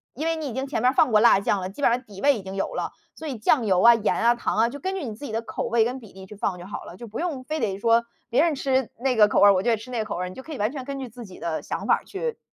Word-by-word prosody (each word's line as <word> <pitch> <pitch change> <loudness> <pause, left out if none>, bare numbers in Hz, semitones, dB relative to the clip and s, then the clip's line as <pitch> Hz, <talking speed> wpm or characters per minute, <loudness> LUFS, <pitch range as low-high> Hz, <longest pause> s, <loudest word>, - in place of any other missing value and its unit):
因 305 - -4
为 330 0 +1
你 315 -2 -4
已 245 - -5
经 265 +2 -2
前 280 - -2
面 250 - +4
儿 - - -9
放 275 -6 +3
过 215 - +5
辣 225 -3 +6
酱 200 -1 0
了， 185 - -4
基 275 +9 -8
本 - - +5
上 245 +2 0
底 200 -5 -13
味 280 -1 +3
已 - - -7
经 190 0 -8
有 195 - -2
了。 - - -3 0.2
所 320 - -8
以 260 -5 -4
酱 225 +1 +2
油 185 -2 +3
啊、 235 0 +9
盐 225 -2 0
啊、 235 +1 +4
糖 235 - -2
啊， 225 +1 +4
就 285 +3 -8
根 380 +5 -3
据 365 - -4
你 220 - -5
自 235 - -12
己 250 - -5
的 225 +1 -2
口 - - -4
味 225 -1 +3
跟 255 +2 -3
比 220 -5 -14
例 190 0 -11
去 210 +2 -12
放 195 -2 -2
就 175 - -10
好 205 - -7
了。 175 - -11
就 235 - -9
不 215 - -6
用 310 -7 -3
非 310 +3 -3
得 200 -5 -1
说 230 +2 +3 0.3
别 245 - +3
人 325 -4 +1
吃 265 -2 0
那 255 +1 0
个 210 -1 +6
口 - - +1
味 200 - +7
儿， 200 - +8
我 185 - +1
就 240 - 0
得 225 - +3
吃 230 +4 -11
那 240 - -2
个 - - 0
口 - - -4
味 180 - -2
儿。 180 - -5
你 - - -11
就 - - -8
可 315 - -11
以 285 - -5
完 210 +4 0
全 270 -3 -6
根 275 +1 -5
据 255 -3 -6
自 240 +1 -10
己 185 -3 -12
的 165 -2 -3
想 - - -5
法 - - +4
儿 - - -25
去 460 +3 -4
235 Hz, 410 characters per minute, -24 LUFS, 205-270 Hz, 0.3 s, 啊